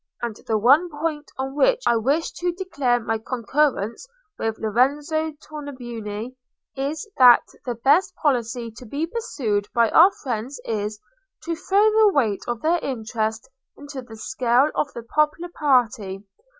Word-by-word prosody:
And 235 -3 -2
the 220 - +2
one 280 - +4
point 300 -1 -4
on 265 +1 -3
which - - +2
I 235 - +4
wish 275 +9 0
to 355 0 -2
declare 290 -10 0
my 225 -1 -2
concurrence 250 - -1 0.3
with 225 -1 -2
Lorenzo 290 +8 0
Tornabuoni 245 -7 -7 0.4
is, 285 +7 -3
that 250 -2 +8 0.2
the 245 -2 -2
best 280 - +3
policy 240 -4 -1
to 250 - -10
be 285 +8 -2
pursued 240 - -2
by 230 -2 +3
our 360 +5 +7
friends 250 +1 -4
is, 210 -1 -3 0.4
to 335 -1 -2
throw 390 +5 +2
the 430 -2 +5
weight 220 -8 +1
of 240 -1 -3
their 340 +2 +2
interest 220 -3 -3 0.3
into 285 -2 -8
the 235 -3 -12
scale 255 +2 +2
of 290 - -1
the 235 - -6
popular 305 +7 0
party. 230 - +1
260 Hz, 150 wpm, -23 LUFS, 230-305 Hz, 0.4 s, that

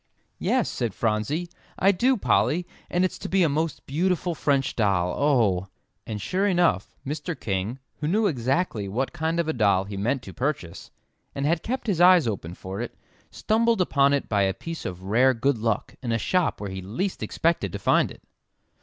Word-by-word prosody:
"Yes," - - +1
said 115 -5 -3
Phronsie. 115 +10 -1 0.3
"I 195 - +5
do, 250 +7 +2
Polly, 175 -3 +2 0.2
and 180 +1 +2
it's 185 - -3
to - - -6
be 190 -1 +3
a - - +4
most 155 +3 -2
beautiful 175 +4 0
French 140 -4 0
doll 95 -5 +1
oh!" 110 -11 +2 0.4
And 110 -2 -4
sure 190 - 0
enough, 175 - +1
Mr. 150 +2 -4
King, 100 +4 -2 0.2
who 150 - -2
knew 210 +7 +2
exactly 130 - 0
what 125 +7 -2
kind 160 +1 -1
of 170 - 0
a 160 - 0
doll 100 -5 +3
he 100 0 -7
meant 125 +6 -1
to - - -9
purchase, 125 - -3 0.5
and 140 - -1
had 165 +2 +1
kept 255 +7 -3
his 190 -7 0
eyes 180 -4 +7
open 90 -6 -4
for 95 +4 -6
it, 120 - -6 0.3
stumbled 230 +1 +1
upon 140 -6 +3
it 140 -1 0
by 100 -2 +1
a 95 -1 +1
piece 165 -1 -7
of 90 0 -5
rare 125 +7 +3
good 130 +1 +1
luck 110 -1 -1
in 120 -3 -3
a 115 - +2
shop 180 - 0
where 100 -1 -5
he 95 0 -5
least 150 - -3
expected 160 - 0
to - - -4
find - - +3
it. - - -13
140 Hz, 195 wpm, -25 LUFS, 105-175 Hz, 0.5 s, eyes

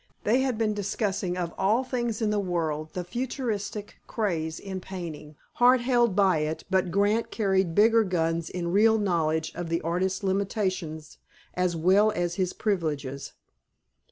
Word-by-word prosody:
They 230 +5 +3
had 260 -4 0
been 215 -1 +1
discussing, 195 -3 -2
of 175 -2 -3
all 220 +7 +2
things 240 -3 -2
in 210 - +1
the 210 - +1
world, 160 -5 -2
the 180 - -3
futurist 225 0 -3 0.3
craze 165 -8 -2
in 190 -2 -6
painting. 165 -5 -7 0.2
Hart 250 +1 +5
held 240 -4 +2
by 195 -5 +4
it, 155 +1 -3
but 190 -1 +2
Grant 205 +5 +1
carried 190 -5 0
bigger 225 +2 +5
guns 165 -3 -1
in 170 -1 -3
real 220 +2 +5
knowledge 160 -6 0
of 175 -2 -5
the 165 0 0
artist's 185 +4 -1
limitations 190 -5 -2 0.3
as 180 -1 0
well 190 +6 +4
as 175 -3 -1
his 185 0 -1
privileges. 150 -9 -2
190 Hz, 155 wpm, -27 LUFS, 170-215 Hz, 0.3 s, Hart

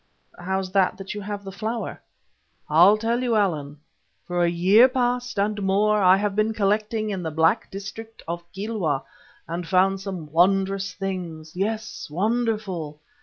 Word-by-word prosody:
"How's 190 +1 -2
that 190 -1 +2
as 195 0 -6
you 210 - -6
have 205 0 -5
the 195 - -7
flower?" 220 +4 -4 0.7
"I'll 175 +7 +6
tell 230 +3 0
you, 240 -3 +1
Allan. 155 -8 0 0.5
For 175 0 0
a 170 - +3
year 190 +8 +6
past 245 -2 -1
and 205 +1 0
more 205 +2 +2
I 185 0 +6
have 205 0 -1
been 215 +1 +1
collecting 215 +1 0
in 190 -2 -3
the 165 - -3 0.4
district 210 +3 -8
back - - -37
of 170 +1 -6
Kilwa 190 -8 -2 0.4
and 170 +1 -4
found 190 +1 +2
some 180 -6 -6
wonderful 195 +2 +2
things, 175 -5 -5
yes, 215 +3 -3
wonderful. 195 -5 -1
195 Hz, 155 wpm, -24 LUFS, 180-215 Hz, 0.7 s, I'll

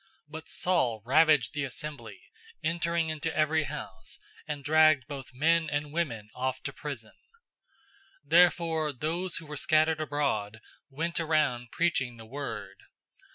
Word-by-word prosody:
008:003 195 - -33 0.2
But 160 0 -8
Saul 130 -12 +1
ravaged 145 -2 +4
the 145 -2 -2
assembly, 135 -5 -7 0.4
entering 170 -1 0
into 160 +1 -3
every 155 0 +2
house, 140 -10 -6 0.3
and 145 -2 -4
dragged 155 -2 +5
both 140 -4 -7
men 160 +5 +2
and 145 0 -2
women 125 -11 -2
off 130 +1 -2
to 140 - -4
prison. 130 -8 -7 1.1
008:004 - - -29
Therefore 165 -3 +4
those 170 +7 -2
who 165 - -6
were 150 0 -7
scattered 155 +2 +3
abroad 135 -8 -1 0.3
went 165 +5 -2
around 150 -7 +1
preaching 130 -9 0
the 115 - -11
word. 110 -6 -6
150 Hz, 140 wpm, -29 LUFS, 130-160 Hz, 1.1 s, dragged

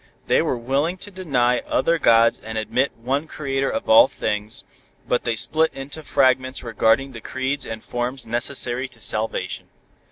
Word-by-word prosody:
They - - +3
were - - -1
willing 140 +9 -1
to 205 - -9
deny 130 -10 +1
other 165 +5 0
gods 115 -3 +4
and 110 0 -5
admit 115 +5 0
one 135 +6 -2
Creator 135 -3 -2
of 280 - -3
all 285 +1 +8
things, 105 0 -4 0.4
but 125 - 0
they 120 -1 0
split 160 +8 +2
into 135 +3 -7
fragments 130 -3 +1
regarding 115 +3 +1
the 115 -3 -9
creeds 130 +4 -3
and 110 -1 -6
forms 125 +2 -3
necessary 120 +2 -1
to 115 - -17
salvation. 110 +1 -2
130 Hz, 160 wpm, -22 LUFS, 115-140 Hz, 0.4 s, all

